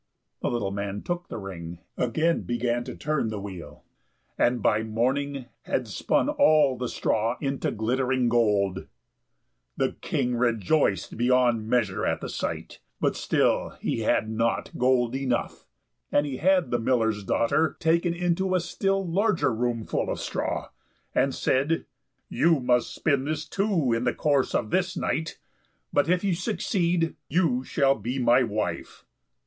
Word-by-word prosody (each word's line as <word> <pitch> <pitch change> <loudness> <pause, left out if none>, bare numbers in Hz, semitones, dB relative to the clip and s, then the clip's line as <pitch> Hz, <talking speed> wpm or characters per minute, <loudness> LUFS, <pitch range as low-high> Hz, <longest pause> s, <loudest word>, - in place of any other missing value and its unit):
The - - 0
little 110 -5 -1
man 100 0 -4
took 175 0 -3
the - - -6
ring, 90 -4 -7 0.2
again 155 +8 +1
began 120 0 -1
to - - -7
turn 150 -5 -1
the 110 -2 -4
wheel, 95 -4 -9 0.5
and 120 0 +2
by 105 0 +2
morning 130 +5 -1 0.2
had 125 - -1
spun 105 - 0
all 155 - +4
the 125 0 -3
straw 115 +3 0
into 135 -2 -1
glittering 125 +3 0
gold. 105 -5 +1 0.9
The - - +1
King 125 0 -1
rejoiced 115 - +1
beyond 120 -2 +2
measure 110 -7 +1
at - - 0
the - - -6
sight, - - -4 0.2
but - - +1
still - - +1
he - - -2
had 115 0 +1
not 115 +1 -1
gold 125 -1 +2
enough; 130 -3 -2 0.4
and 145 - +3
he 135 -3 -4
had 180 -3 +2
the 120 - +1
miller's 115 -3 +1
daughter 140 +10 +1
taken 170 +1 +2
into 180 +2 0
a - - +3
still 195 +2 -1
larger 190 - +1
room 115 -1 -1
full - - -1
of - - -2
straw, - - -3 0.4
and 135 - +1
said, 140 +5 +1 0.4
"You 165 -2 +3
must 125 -1 +1
spin 140 -3 0
this, 155 +1 -3
too, 190 - +1
in 115 +2 0
the 125 - +1
course 140 -3 +1
of 110 - -1
this 185 -1 0
night; 160 0 -2 0.6
but 145 +2 +2
if 180 +1 +2
you 195 -2 +2
succeed, 175 -3 0
you 160 -8 +2
shall 135 0 +2
be 125 +2 -4
my 125 0 +4
wife." 110 -3 -3
125 Hz, 155 wpm, -26 LUFS, 115-160 Hz, 0.9 s, all